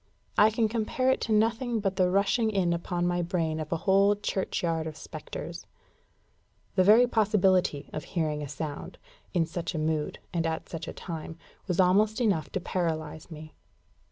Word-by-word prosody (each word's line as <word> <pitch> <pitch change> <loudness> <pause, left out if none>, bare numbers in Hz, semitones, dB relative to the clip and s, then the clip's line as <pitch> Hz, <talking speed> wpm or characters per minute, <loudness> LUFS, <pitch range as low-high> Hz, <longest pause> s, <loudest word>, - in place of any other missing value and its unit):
I 210 - +6
can 220 0 +1
compare 235 +4 0
it - - 0
to 225 - -2
nothing 225 +2 +2
but 195 -2 -1
the 185 -1 +3
rushing 200 +4 +2
in 190 -5 +1
upon 175 +1 -2
my 175 0 +1
brain 165 -2 -1
of 155 -1 -5
a 165 - +1
whole 200 +1 +5
churchyard 170 -5 -2
of 155 -1 -7
spectres. - - -8 1.1
The 185 - +4
very 220 +6 +7
possibility 195 -9 +2
of 155 - -4
hearing 155 -3 -2
a 145 - -4
sound, 145 +1 -6 0.4
in 170 -2 +3
such 170 +2 -4
a - - -1
mood, 155 -1 -1 0.2
and 165 -1 0
at 160 0 -3
such 165 -1 -6
a - - -5
time, 165 -2 -7 0.3
was 180 -1 -1
almost 210 +5 +4
enough 200 -10 +1
to 190 - 0
paralyse 160 -4 -3
me. 155 -1 -10
180 Hz, 175 wpm, -28 LUFS, 160-210 Hz, 1.1 s, very